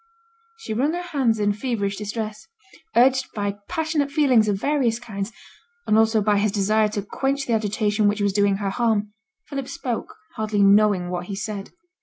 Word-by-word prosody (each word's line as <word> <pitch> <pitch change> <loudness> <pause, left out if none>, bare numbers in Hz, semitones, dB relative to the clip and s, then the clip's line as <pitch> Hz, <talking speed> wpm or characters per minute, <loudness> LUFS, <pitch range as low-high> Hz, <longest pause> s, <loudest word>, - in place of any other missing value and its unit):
She 455 - -6
wrung 275 +8 +1
her 355 +1 -3
hands 265 -10 +1
in 205 0 +2
feverish 205 -3 -2
distress. 215 0 -5 0.5
Urged 260 +2 +4
by 205 -1 -2
passionate 315 -3 0
feelings 260 -7 +4
of 205 - +2
various 265 -4 +1
kinds, 210 -3 -5 0.5
and 215 - +2
also 220 0 +4
by 205 -1 +3
his 210 0 +1
desire 215 +2 +2
to 210 -1 -3
quench 270 +6 -2
the 235 - -1
agitation 210 -1 +1
which 205 +1 +1
was 200 -1 +1
doing 200 -1 +3
her 200 -1 -2
harm, 210 -2 0 0.3
Philip 275 -3 -4
spoke, 335 - -4 0.2
hardly 215 -2 +1
knowing 200 -3 +4
what 175 0 -3
he 200 - -4
said. 200 0 -5
215 Hz, 175 wpm, -23 LUFS, 205-255 Hz, 0.5 s, Urged